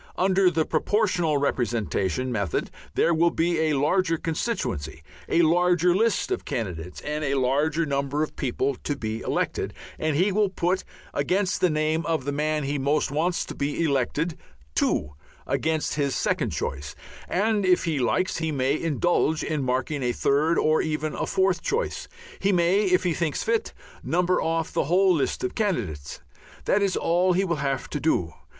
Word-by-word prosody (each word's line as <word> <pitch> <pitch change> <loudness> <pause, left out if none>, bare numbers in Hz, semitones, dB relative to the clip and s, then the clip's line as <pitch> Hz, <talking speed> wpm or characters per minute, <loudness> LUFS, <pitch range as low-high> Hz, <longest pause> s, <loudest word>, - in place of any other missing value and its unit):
Under 190 0 +4
the 160 -2 0
Proportional 175 -3 +1
Representation 120 -4 -1
method 100 -8 -2 0.2
there 170 - +3
will 170 +1 +4
be 170 0 0
a - - +1
larger 165 +4 +2
constituency, 130 - -3 0.3
a 170 - +4
larger 175 +1 +3
list 225 - +1
of 380 - -1
candidates, 90 -6 -5
and 150 +1 -3
a 140 -1 0
larger 145 +5 +1
number 140 +1 -1
of 155 - -5
people 135 +1 -1
to 145 - -1
be 110 -4 -4
elected, - - -2 0.2
and 155 -1 0
he 185 +7 +3
will 205 0 +2
put 185 0 0 0.3
I - - -3
against 185 +6 0
the 180 - +4
name 155 +1 0
of 160 -5 -1
the 145 - -1
man 150 +1 0
he 140 +1 -2
most 145 +1 +1
wants 170 +5 0
to - - -7
be 145 +3 -2
elected, 150 +3 0 0.3
2 - - 0 0.3
against 160 -1 0
his 140 -2 0
second - - 0
choice, 70 0 -4 0.3
and 210 +2 +1
if 185 -1 +3
he 160 -5 -1
likes 185 +9 +1
he 160 -1 -1
may 135 +1 0
indulge 160 0 +1
in 155 -2 -1
marking 130 +3 -1
a 125 -1 0
third, 155 +7 +2
or 155 0 +3
even 155 0 -2
a - - -3
further 190 -2 +2
choice. 465 +3 -2 0.3
He 200 - +2
may, 180 +3 +3
if 185 0 +3
he 175 -2 +1
thinks 160 -3 -1
fit, 230 0 0 0.3
number 180 +2 +1
off 165 0 -1
the - - +1
whole 185 +4 +4
list 155 - -1
of 375 - -2
candidates. 90 - -2 0.4
That 205 - +2
is 195 -2 +1
all 180 +2 +2
he 190 +2 +2
will 170 -3 -1
have 140 -2 -2
to 150 - -2
do. 90 - 0
155 Hz, 175 wpm, -25 LUFS, 140-180 Hz, 0.4 s, Under